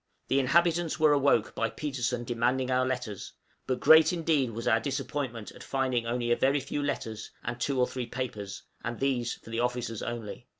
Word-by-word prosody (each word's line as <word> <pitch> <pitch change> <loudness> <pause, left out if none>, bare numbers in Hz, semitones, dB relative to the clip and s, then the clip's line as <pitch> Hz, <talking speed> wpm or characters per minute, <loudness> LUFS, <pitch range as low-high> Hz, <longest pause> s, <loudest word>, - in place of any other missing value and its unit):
The 135 - +3
inhabitants 170 +4 +2
were 155 -1 +5
awoke 140 -6 +3
by 115 - 0
Petersen 125 -5 -2
demanding 125 +2 0
our 130 0 +3
letters, 120 -6 -4 0.3
but 130 -1 0
great 160 0 +7
indeed 160 -7 +1
was 115 +1 -5
our 115 -1 +4
disappointment 135 -4 -3
at - - -14
finding 130 -3 -1
only 120 0 -1
a - - +5
very 135 +4 +2
few 140 +2 -3
letters 110 -6 -3
and 120 0 -4
two 135 0 0
or 125 - +5
three 125 -1 -5
papers, 110 -6 -5 0.2
and 115 0 -4
these 125 -3 0
for 115 - -14
the 115 - -2
officers 120 -2 -1
only! 120 0 -5
125 Hz, 185 wpm, -29 LUFS, 115-140 Hz, 0.3 s, great